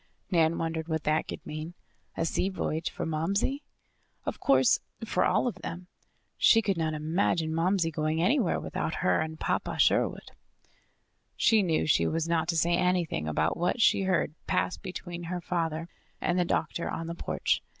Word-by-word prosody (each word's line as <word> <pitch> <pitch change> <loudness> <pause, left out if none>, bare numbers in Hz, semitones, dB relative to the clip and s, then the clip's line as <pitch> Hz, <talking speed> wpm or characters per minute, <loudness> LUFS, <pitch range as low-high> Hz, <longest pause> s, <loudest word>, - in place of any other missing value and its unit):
Nan 165 -2 +3
wondered 160 0 -2
what 160 -2 -2
that 155 +1 +1
could - - -7
mean. 155 +3 -6 0.4
A - - 0
sea 185 +3 0
voyage 165 -4 -2
for - - -5
Momsey? 195 - 0 0.6
Of - - -3
course, - - +4 0.3
for - - +1
all - - +2
of 245 - 0
them. 175 +2 -6 0.5
She 225 0 +5
could 195 -2 +1
not 160 -2 -1
imagine 160 +1 0
Momsey 170 +1 +1
going 155 0 -1
anywhere 190 - +2
without 160 - -3
her - - +3
and 160 0 -4
Papa - - -1
Sherwood. - - +2 1.0
She 220 -2 +4
knew 165 -5 +1
she 155 - +3
was 165 0 -1
not 165 -1 +1
to 170 -1 0
say 170 +2 +2
anything 175 - 0
about 80 +2 +1
what 175 +7 0
she 215 - +4
heard 185 -5 +1
pass - - +1
between 175 -1 -7
her 180 +1 -3
father 165 -2 -2 0.3
and 175 +1 0
the 175 - +2
doctor 170 0 -1
on 165 - -4
the 165 - -4
porch. - - -1
165 Hz, 170 wpm, -29 LUFS, 160-180 Hz, 1.0 s, She